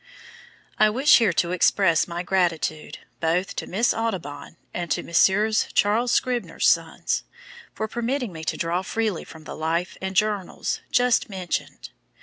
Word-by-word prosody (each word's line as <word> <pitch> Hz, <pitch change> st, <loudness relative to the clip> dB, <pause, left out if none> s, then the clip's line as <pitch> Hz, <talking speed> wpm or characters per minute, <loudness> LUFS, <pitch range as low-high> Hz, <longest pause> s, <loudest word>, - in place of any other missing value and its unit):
I 215 Hz, -, +6 dB
wish 260 Hz, +7 st, +5 dB
here 220 Hz, -5 st, +3 dB
to 165 Hz, +2 st, 0 dB
express 180 Hz, -1 st, +3 dB
my 175 Hz, 0 st, -4 dB
gratitude 170 Hz, -4 st, -1 dB, 0.2 s
both 170 Hz, +3 st, 0 dB
to -, -, -3 dB
Miss 220 Hz, +6 st, +1 dB
Audubon, 180 Hz, -10 st, -4 dB, 0.2 s
and 175 Hz, -1 st, -4 dB
to -, -, 0 dB
Messrs. 210 Hz, +6 st, +3 dB
Charles 225 Hz, +4 st, +2 dB
Scribner's 250 Hz, -2 st, 0 dB
Sons, -, -, +1 dB, 0.5 s
for 220 Hz, -, -2 dB
permitting 240 Hz, -1 st, -2 dB
me 160 Hz, -1 st, -8 dB
to -, -, -2 dB
draw 170 Hz, +2 st, -1 dB
freely 210 Hz, -1 st, -2 dB
from 160 Hz, -1 st, -13 dB
the -, -, -8 dB
"Life 165 Hz, +3 st, -2 dB
and 190 Hz, 0 st, -4 dB
Journals" 210 Hz, -2 st, -1 dB
just 245 Hz, -3 st, +2 dB
mentioned. 185 Hz, -4 st, -5 dB
190 Hz, 145 wpm, -24 LUFS, 170-220 Hz, 0.5 s, I